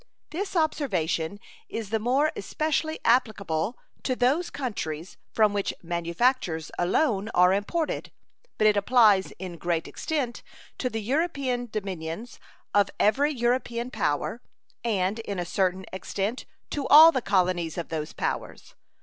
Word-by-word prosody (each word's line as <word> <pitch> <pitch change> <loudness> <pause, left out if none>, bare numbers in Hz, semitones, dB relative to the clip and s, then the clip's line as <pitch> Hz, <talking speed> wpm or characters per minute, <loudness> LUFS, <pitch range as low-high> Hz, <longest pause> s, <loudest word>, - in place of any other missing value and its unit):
This 385 +4 -4
observation 200 - 0 0.3
is 220 -3 -5
the 220 - +1
more 265 +7 +2
especially 315 0 -1
applicable 215 -5 +1 0.2
to 255 - -1
those 275 +8 +2
countries 180 - -4 0.2
from 215 -2 +3
which 200 -1 -1
manufactures 170 - 0
alone 205 - +1
are 180 +1 +6
imported, 295 - -2 0.5
but 215 - +2
it 210 -1 +5
applies 205 -2 +4
in 180 -2 -7
great 170 -1 -1
extent 275 -7 -3 0.4
to 250 - 0
the 225 -2 -4
European 265 -2 -1
dominions 195 +1 -5 0.3
of 205 -1 +4
every 280 +8 +3
European 240 -1 -1
power 215 - -1 0.4
and 205 -2 0
in 205 -3 -4
a 175 - -2
certain 185 +1 0
extent 200 +5 -3 0.2
to 285 -2 -2
all 315 +3 +10
the 260 - -1
colonies 180 -5 +1
of 170 - -4
those 155 -2 -3
powers. - - -4
215 Hz, 130 wpm, -26 LUFS, 185-255 Hz, 0.5 s, all